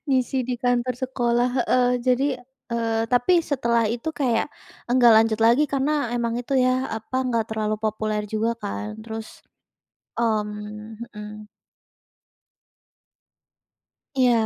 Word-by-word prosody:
ngisi 260 -1 +1
di 250 - 0
kantor 245 0 +1
sekolah 245 -1 +1 0.2
heeh. 250 0 +3 0.2
Jadi, 255 +2 +3 0.5
eee, 225 -1 0
tapi 255 +8 +4
setelah 235 -6 +1
itu 235 +6 -3
kayak 250 -7 +1 0.4
enggak 245 -2 +6
lanjut 220 -1 +3
lagi 235 +6 +5
karena 280 -1 +1
emang 235 -1 -1
itu 245 - -6
ya, 255 0 +2
apa, 220 +4 -5
enggak 230 -3 0
terlalu 215 -1 -1
populer 215 -1 -1
juga 220 +2 0
kan, 210 +1 -5
terus, 220 0 -8 0.8
mmm, 215 -1 -3
mhm. 210 0 -7 2.8
Iya, 255 -2 +4
235 Hz, 115 wpm, -24 LUFS, 220-255 Hz, 2.8 s, enggak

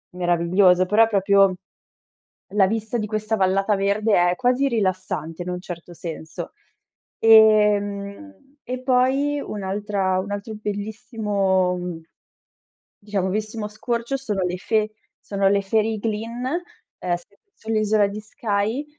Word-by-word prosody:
meraviglioso, 180 +1 +3
però 215 +4 +5
è - - -4
proprio 195 -2 +4 1.0
la 200 -2 +5
vista 220 +3 -2
di 215 - -2
questa 215 +1 -2
vallata 195 +2 +2
verde, 200 -2 +2
è - - -4
quasi 255 +2 +2
rilassante 185 - -2
in 180 - -5
un 180 0 -4
certo 175 -1 -9
senso. 160 -1 -7 0.7
Ehm, 215 +5 +3
e 255 +1 -5
poi 265 +3 +2
un'altra 200 -3 -2
un 200 +2 -6
altro 205 +2 -5
bellissimo 205 -3 -1 1.2
diciamo, 200 -2 -2
bellissimo 215 +2 -3
scorcio 235 +4 -2
sono 210 -8 -2
le 180 0 -2
Fe 215 +2 0 0.3
sono 195 -1 0
le 200 0 +2
Fairy 215 +2 0
Glen, 225 +3 -3 0.6
uhm, 175 -1 0
s 175 - -10 0.3
sull'isola 215 -2 +1
di 205 +2 -6
Skye, 215 +4 -2
210 Hz, 125 wpm, -23 LUFS, 190-225 Hz, 1.2 s, però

